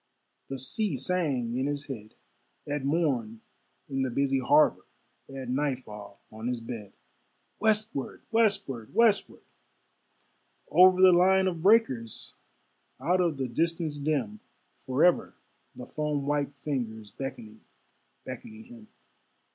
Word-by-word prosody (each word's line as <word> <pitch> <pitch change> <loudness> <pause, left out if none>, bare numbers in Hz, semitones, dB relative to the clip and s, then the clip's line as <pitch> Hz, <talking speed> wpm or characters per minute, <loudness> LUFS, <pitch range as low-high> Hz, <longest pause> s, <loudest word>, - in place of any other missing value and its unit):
The 135 - -5
sea 145 - -1
sang 135 -6 -1
in 130 +2 0
his 145 -1 -3
head, 110 -6 -8 0.5
At 145 -1 -3
morn 135 -8 0 0.5
in 135 -1 -2
the 130 - 0
busy 135 +2 +1
harbor, 145 +4 +3 0.4
At 135 -2 -7
nightfall 125 -7 -3
on 110 +2 -6
his 125 -1 -1
bed 115 -4 -8 0.7
Westward! 215 -10 -1
westward! 195 - 0
westward! 225 -2 +2 1.3
Over 185 0 +7
the 185 - +9
line 190 +2 +4
of 175 -3 -2
breakers, 160 - +2 0.7
Out 180 +2 +2
of 170 -5 0
the 135 -1 -2
distance 160 +3 -1
dim; 135 -8 -1 0.5
Forever 150 +7 +2 0.4
the 125 - -8
foam 150 -2 -2
white 145 -1 -1
fingers 115 -8 -4
Beckoning, 110 -5 -8 0.6
beckoning 220 - -9
him. 235 -2 -14
140 Hz, 115 wpm, -28 LUFS, 125-175 Hz, 1.3 s, the